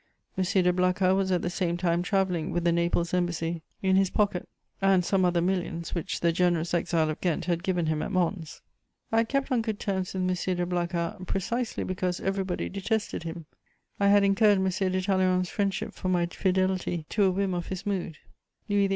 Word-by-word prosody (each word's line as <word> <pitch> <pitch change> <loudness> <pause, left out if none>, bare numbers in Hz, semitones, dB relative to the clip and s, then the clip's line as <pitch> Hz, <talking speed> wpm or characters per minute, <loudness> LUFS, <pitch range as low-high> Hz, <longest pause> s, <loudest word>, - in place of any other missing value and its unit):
M. 190 - +1
de 180 -1 +2
Blacas 185 +1 +2
was 190 -1 0
at 180 -2 +1
the 175 - 0
same 175 -2 -1
time 175 -1 +1
travelling 180 -3 0
with 175 - -1
the 170 - +3
Naples 170 0 0
Embassy 170 -2 -1 0.2
in 190 0 +4
his 195 -1 +3
pocket, 200 -3 0 0.3
and 190 -2 +4
some 190 0 +2
other 175 -1 +2
millions 175 -2 -2
which 170 - -3
the 170 - +3
generous 175 -1 +1
exile 165 -2 +1
of 155 - -7
Ghent 175 -1 0
had 170 -1 0
given 180 -2 0
him 155 -1 0
at - - -3
Mons. 175 -3 -2 0.5
I 225 - +2
had 225 0 +2
kept 275 0 0
on 245 -3 +3
good 220 -2 -3
terms 190 -2 -2
with 185 - -1
M. 185 0 0
de 175 - 0
Blacas, 175 -1 -2
precisely 235 +5 -2
because 180 -1 -2
everybody 195 -2 -2
detested 205 +3 -2
him; 165 -1 -6 0.5
I 200 - +3
had 200 0 +6
incurred 200 +1 +4
M. 190 0 +1
de 185 0 0
Talleyrand's 185 -2 +2
friendship 195 -2 -2
for 185 - -4
my 175 -1 +2
fidelity 185 -2 0
to 205 -2 +2
a - - +4
whim 195 0 0
of 175 -1 -3
his 190 -1 -5
mood; 185 -6 -2 0.5
Louis 205 -1 +2
XVIII. - - -7
185 Hz, 205 wpm, -27 LUFS, 175-195 Hz, 0.5 s, had